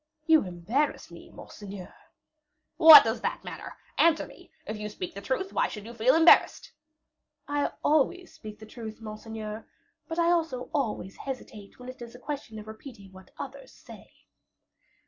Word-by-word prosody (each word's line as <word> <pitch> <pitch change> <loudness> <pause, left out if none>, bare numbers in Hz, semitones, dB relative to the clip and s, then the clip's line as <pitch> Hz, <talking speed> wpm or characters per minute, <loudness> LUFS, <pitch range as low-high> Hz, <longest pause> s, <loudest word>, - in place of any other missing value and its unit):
"You 320 -1 +5
embarrass 185 - -2
me, - - -13
monseigneur." 200 -3 -11 0.8
"What 320 -2 +11
does 225 +1 -2
that - - -3
matter? - - -8 0.2
Answer 330 -1 +4
me. - - -16 0.2
If 215 - -5
you 210 0 -5
speak 185 -3 -7
the 200 - -8
truth, 265 - -3
why - - +1
should 210 -2 -9
you 235 - -9
feel 240 +4 +3
embarrassed?" 325 +1 +5 0.8
"I 290 0 0
always 330 +5 +1
speak 215 -1 -10
the 220 - -12
truth, 220 -1 -9
monseigneur; 215 0 -8 0.4
but 325 - -5
I 340 0 +3
also 320 -8 -1
always 220 -8 -3
hesitate 230 -6 -8
when 250 - -12
it 255 -1 -10
is 235 0 -10
a - - -12
question 280 -5 -6
of 210 - -9
repeating 220 -2 -12
what 190 0 -15
others - - -9
say." - - -15
235 Hz, 165 wpm, -27 LUFS, 215-295 Hz, 0.8 s, What